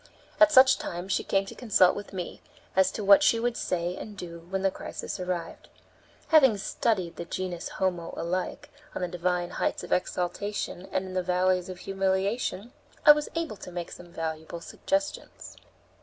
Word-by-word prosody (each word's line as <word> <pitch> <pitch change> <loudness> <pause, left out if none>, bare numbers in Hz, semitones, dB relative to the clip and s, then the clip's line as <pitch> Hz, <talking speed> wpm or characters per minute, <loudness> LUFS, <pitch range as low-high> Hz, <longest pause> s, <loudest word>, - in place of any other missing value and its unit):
At 315 0 +7
such 260 -2 +7
times 180 +2 -4
she - - 0
came 195 0 +1
to - - -8
consult 205 -6 +4
with 205 0 -7
me, 180 -3 -6 0.3
as 190 0 +5
to 215 - -4
what 200 +6 +7
she 265 -6 +4
would 240 0 0
say 175 0 -2
and 210 +1 -8
do 170 -2 -8
when 190 0 -2
the 195 - +3
crisis - - -6
arrived. 180 -2 -4 0.6
Having 270 -9 +6
studied 190 -3 -1
the 170 - -5
genus 180 -1 -4
homo 175 -3 -2
alike 185 - -3 0.2
on - - -2
the - - 0
divine 175 0 -1
heights - - -1
of - - -2
exaltation 185 +1 -2
and 190 - -1
in 185 - -7
the 185 - +1
valleys 180 0 +1
of 185 - -6
humiliation, 195 +3 -1 0.3
I - - +12
was 300 0 +2
able 330 -10 -2
to 180 - -9
make 175 -1 -5
some 175 -1 -11
valuable 160 0 -5
suggestions. 290 - -3
185 Hz, 175 wpm, -28 LUFS, 175-210 Hz, 0.6 s, I